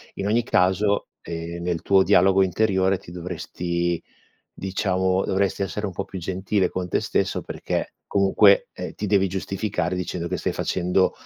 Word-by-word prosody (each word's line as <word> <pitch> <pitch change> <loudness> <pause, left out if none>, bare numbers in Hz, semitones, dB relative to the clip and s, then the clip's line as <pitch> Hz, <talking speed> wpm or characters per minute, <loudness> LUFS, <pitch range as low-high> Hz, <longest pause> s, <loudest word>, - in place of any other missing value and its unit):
In 100 - -3
ogni 115 +3 +2
caso, 100 0 +2
ehm, 85 +1 -6
nel 85 -2 -1
tuo 95 -1 +5
dialogo 95 0 +5
interiore 95 0 +2
ti 85 - -13
dovresti 85 -1 -3 0.6
diciamo, 95 -1 0
dovresti 95 -1 0
essere 95 +2 -3
un 95 - -5
po' 95 +2 -4
più 95 - -7
gentile 95 +2 0
con 90 -1 -3
te - - +1
stesso, - - -1
perché - - -4
comunque, 100 0 +4
ehm, - - -7
ti 105 - -4
devi 95 -1 +3
giustificare 95 -1 -2
dicendo 90 -1 -3
che - - -1
stai - - -1
facendo, 90 +1 +1
95 Hz, 160 wpm, -24 LUFS, 90-100 Hz, 0.6 s, tuo